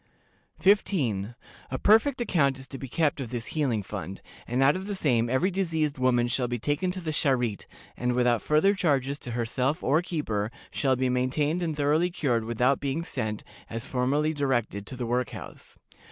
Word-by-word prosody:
"15. 130 - +2 0.3
A 130 - -2
perfect 225 - +4
account 145 - +2
is 130 0 -10
to 135 - -8
be 135 - -6
kept 150 +1 0
of 125 - -5
this 120 -1 -4
healing 130 -9 0
fund, 95 -2 -6 0.3
and 125 +3 +1
out 140 +2 +5
of 190 +1 -5
the 205 - -3
same 120 -9 +1
every 130 +10 +2
diseased 160 -7 -1
woman 125 -2 +3
shall 125 0 0
be 120 0 -2
taken 145 - -1
to 185 +1 -3
the 160 -2 -3
Charité, 125 -8 0 0.3
and, 125 0 0
without 120 -2 +2
farther 155 +7 +3
charges 145 -7 0
to 120 - -7
herself 125 +6 -1
or 150 +5 +3
keeper, 115 - -2 0.2
shall 135 -2 +1
be 130 +1 0
maintained 135 +6 0
and 160 -3 -2
thoroughly 150 +4 +2
cured 125 -10 0
without 125 +4 +2
being 140 +4 -2
sent, 110 -10 -3 0.3
as 115 0 -4
formerly 140 +5 +1
directed, 120 -8 -1
to 130 - -6
the 125 -1 -3
work 125 +2 0
house. - - -10
135 Hz, 185 wpm, -27 LUFS, 120-155 Hz, 0.3 s, out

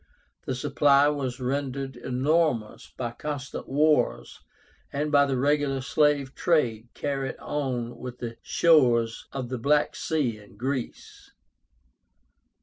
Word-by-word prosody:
The 130 - -1
supply 140 +3 +4
was 135 -4 -3
rendered 135 +1 -3
enormous 130 -3 0
by 120 -2 -3
constant 140 +1 -6
wars, 150 - +1 0.5
and 150 +2 -2
by 140 -1 +5
the 135 -2 0
regular 140 0 +1
slave 140 0 +1
trade 120 -10 +1
carried 135 -2 -3
on 125 -5 -3
with 125 -1 -7
the 115 -2 -6
shores 120 -9 +3
of 130 -3 -5
the 130 -1 -3
Black 145 +4 +2
Sea 135 -9 -1
and 105 -1 -17
Greece. 130 +1 -5
135 Hz, 120 wpm, -26 LUFS, 125-145 Hz, 0.5 s, by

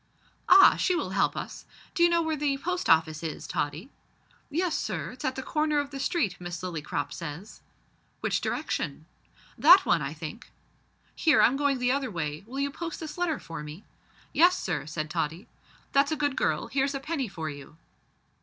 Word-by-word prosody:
"Ah! 385 +1 +8
she 365 - +2
will - - -2
help - - +1
us. - - -6 0.3
D'you 345 -2 +4
know 340 0 +2
where 320 -1 -1
the 285 -2 0
Post 360 +5 -2
Office 160 -1 +3
is, 160 -2 -5
Tottie?" 155 - -3 0.6
"Yes, 345 +2 0
sir, 170 -7 -3
it's 250 - -11
at 260 - -1
the 265 - -5
corner 305 +1 0
of 285 -1 -1
the 275 - -6
street, 255 - -1
Miss 175 0 -6
Lillycrop 165 -5 -3
says." 165 +5 -8 0.6
"Which - - 0
direction?" - - -3 0.5
"That 365 +5 +8
one, 165 - +3
I 145 +2 -4
think." 165 +10 -8 0.7
"Here, 315 -4 +4
I'm 250 - +5
going 285 -1 +1
the 250 0 +1
other 270 -1 0
way: 155 -4 -4
will 265 +3 -6
you 280 0 0
post 330 +2 -6
this 315 -2 -6
letter 350 -4 0
for 165 -2 -8
me?" 150 +6 -9 0.5
"Yes, 350 +5 +5
sir," 175 -4 -3
said 155 0 -3
Tottie. 160 +6 -3 0.4
"That's 280 +2 +3
a - - +1
good 290 -2 0
girl; - - 0
here's 275 +1 0
a - - -2
penny 285 -2 -2
for 160 -5 -5
you." 145 +2 -12
265 Hz, 185 wpm, -28 LUFS, -, 0.7 s, Ah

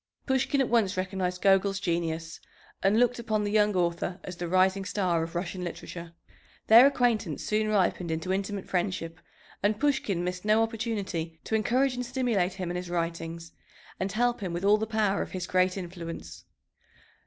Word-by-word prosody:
Pushkin 265 +1 +1
at 265 - +1
once 210 -5 +2
recognized 185 -1 -2
Gogol's 195 0 +3
genius 165 -2 -2 0.4
and 200 +3 +3
looked 245 0 +2
upon 215 -2 -1
the 205 - -1
young 210 -1 +3
author 175 +1 -1
as 185 - -7
the 175 - -3
rising 185 +2 +3
star 185 -4 0
of 165 +1 -5
Russian 180 +1 -3
literature. 170 -1 -7 0.5
Their 235 +5 +9
acquaintance 235 - 0
soon 215 0 0
ripened 185 -4 +1
into 160 +3 -1
intimate 195 0 -3
friendship, 175 -2 -2 0.4
and 205 +1 +1
Pushkin 265 -11 +1
missed 180 0 -3
no 215 +1 +4
opportunity 205 -8 -3
to - - -6
encourage 250 +5 +2
and 250 0 -3
stimulate 240 -8 0
him 185 -2 -4
in 175 - -3
his 180 -1 -5
writings 165 -1 -3 0.5
and 190 +1 -1
help 240 +3 +1
him 185 -5 -4
with 175 +3 -2
all 210 +1 +5
the 220 - -2
power 215 -3 +1
of - - -5
his 185 -2 -3
great 185 0 +2
influence. 170 - -7
190 Hz, 175 wpm, -28 LUFS, 175-215 Hz, 0.5 s, Their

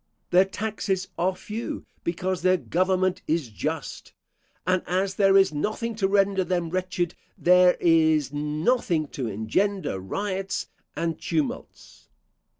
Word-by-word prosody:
Their 185 +2 +6
taxes 195 -2 -3
are 180 +2 0
few, 215 +5 -6 0.2
because 180 +2 -2
their 185 +1 +4
government 185 +1 0
is 155 -6 0
just: 105 - -5 0.5
and 185 0 +2
as 190 +2 0
there 195 -1 +4
is 190 -4 +4
nothing 215 +9 -2
to 195 -3 +2
render 195 -1 +2
them 175 -2 -1
wretched, 180 -1 -1 0.2
there 180 0 +5
is 160 -4 +3
nothing 155 - 0
to 130 -4 -4
engender 110 - -1
riots 195 - -3 0.3
and 165 -1 -2
tumults. 155 -4 -4
185 Hz, 125 wpm, -25 LUFS, 160-195 Hz, 0.5 s, Their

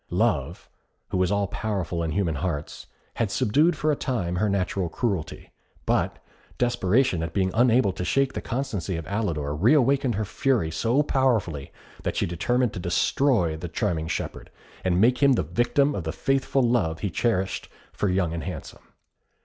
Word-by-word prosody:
Love, - - 0 0.4
who 95 - 0
is 90 +1 +1
all 100 0 +1
powerful 95 -4 -3
in 80 - -1
human 85 +1 0
hearts, 75 -1 -4 0.3
had 115 -3 +1
subdued 140 - +2
for 155 0 +1
a - - +1
time 95 -11 -2
her 105 +3 +1
natural 95 -2 -1
cruelty; 95 -7 -3 0.3
but - - +1 0.4
desperation 120 -4 +2
at 80 0 -5
being 95 -2 +1
unable 120 -3 +4
to 90 - -5
shake 135 +7 +1
the - - -4
constancy 115 -8 -3
of 80 - -6
Alidor 85 -9 -2
re 105 - +4
awakened 135 -3 +2
her 110 +1 -1
fury 105 -3 0
so 115 - +1
powerfully, 110 - 0 0.3
that - - -2
she - - +1
determined 120 +8 0
to - - -5
destroy 90 - +1
the 85 +2 -6
charming 80 -1 -1
shepherd, 80 - -4 0.3
and 90 -1 +2
make 120 +5 +4
him 140 -1 +6
the 95 - +1
victim 120 - +1
of 95 - -3
the 80 - -2
faithful 135 +9 +1
love 105 -10 +1
he 100 - -2
cherished 95 -2 -1 0.2
for 105 - 0
Young 90 -3 0
and 85 - -4
Handsome. 90 -6 -7
100 Hz, 175 wpm, -25 LUFS, 85-125 Hz, 0.4 s, him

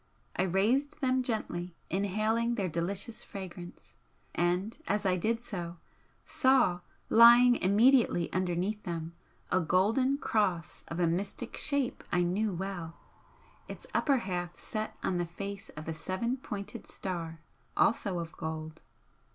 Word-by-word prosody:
I - - +1
raised 215 - +1
them 260 -1 +2
gently, 180 -8 -3 0.2
inhaling 215 +5 +1
their 200 -5 -1
delicious 190 +7 -3
fragrance, 180 -3 -9 0.4
and 180 +5 0
as 205 +1 0
I 185 -1 +3
did 225 +6 0
so, 175 -6 -5 0.5
saw, 260 -10 +3 0.3
lying 240 +1 +8
immediately 215 -2 +4
underneath 185 +3 -1
them, 165 -2 -5 0.4
a 185 - +4
golden 215 - +2
Cross 185 - -1
of 165 - -5
a 175 - +3
mystic 195 +7 -2
shape 280 -4 -1
I 180 0 +3
knew 200 +5 0
well, 175 -2 -5 0.7
its - - -9
upper 275 -3 +3
half 175 -5 -3
set 215 0 -4
on 185 - 0
the 175 - -1
face 200 +4 -6
of 155 - -7
a 160 - -2
seven 190 +10 -2
pointed 205 -6 -7
Star, 165 -4 -4 0.4
also 200 -4 +2
of 165 -1 -4
gold. 160 0 -5
195 Hz, 135 wpm, -31 LUFS, 175-225 Hz, 0.7 s, lying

